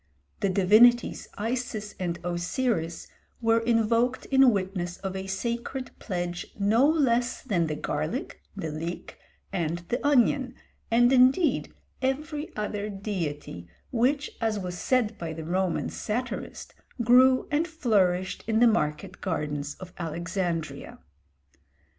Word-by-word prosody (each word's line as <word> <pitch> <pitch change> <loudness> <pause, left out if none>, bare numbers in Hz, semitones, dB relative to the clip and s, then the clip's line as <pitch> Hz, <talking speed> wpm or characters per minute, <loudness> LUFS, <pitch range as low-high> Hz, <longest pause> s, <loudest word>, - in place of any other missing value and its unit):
The 200 - +1
divinities 215 +6 +4
Isis 225 -2 -3
and 175 -2 -2
Osiris 175 0 -1 0.3
were 230 -1 +3
invoked 230 +2 +1
in 270 -1 +7
witness 185 -4 -2
of 190 -1 -5
a 190 0 -4
sacred 235 +6 -3
pledge 175 -3 -3
no 220 +7 +4
less 250 -6 +1
than 180 -10 0
the 155 - -2
garlic, - - -3
the 160 - -4
leek, 165 +3 -6 0.3
and 170 -3 -1
the 245 - -1
onion, 265 -2 +3 0.3
and 240 +2 +4
indeed 265 +7 +4 0.3
every 295 +3 -2
other 210 0 -3
deity 170 - -4 0.2
which, 270 +5 +1
as 220 -2 +1
was 180 -2 -4
said 230 +2 0
by 165 -2 -4
the 160 0 -7
Roman 180 +1 0
satirist, 245 +4 -4 0.3
grew 255 +2 +5
and 305 +3 +1
flourished 195 - +1
in 220 -1 +2
the 240 - +6
market 185 -4 0
gardens 150 -5 -3
of 185 -1 -11
Alexandria. 170 0 -3
210 Hz, 125 wpm, -27 LUFS, 175-245 Hz, 0.3 s, in